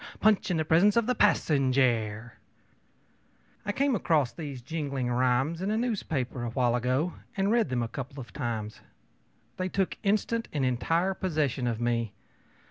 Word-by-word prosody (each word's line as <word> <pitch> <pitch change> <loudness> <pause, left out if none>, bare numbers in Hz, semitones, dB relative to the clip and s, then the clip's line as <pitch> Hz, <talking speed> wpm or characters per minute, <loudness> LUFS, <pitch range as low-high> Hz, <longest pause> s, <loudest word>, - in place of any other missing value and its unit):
Punch 215 -2 +3
in 175 - +1
the 160 - 0
presence 180 +7 +4
of 235 - +3
the 250 - +2
passenjare! 130 - +2 1.4
I - - +2
came 275 +5 +1
across 150 - +1
these 140 -3 -7
jingling 140 -4 -2
rhymes 130 +7 +1
in 195 - -1
a 215 - +1
newspaper, 160 - -2
a - - -2
little 115 - -6
while 120 -2 +3
ago, 130 +8 0 0.2
and 195 +1 +2
read 230 - +2
them 125 -2 0
a - - -2
couple 135 +3 -7
of 120 - -9
times. 110 -5 -4 0.8
They 185 0 -1
took 190 0 -1
instant 215 +3 0
and 140 -3 0
entire 165 +9 +1
possession 150 -9 -1
of 115 -2 -1
me. 120 -2 0
140 Hz, 165 wpm, -28 LUFS, 125-190 Hz, 1.4 s, presence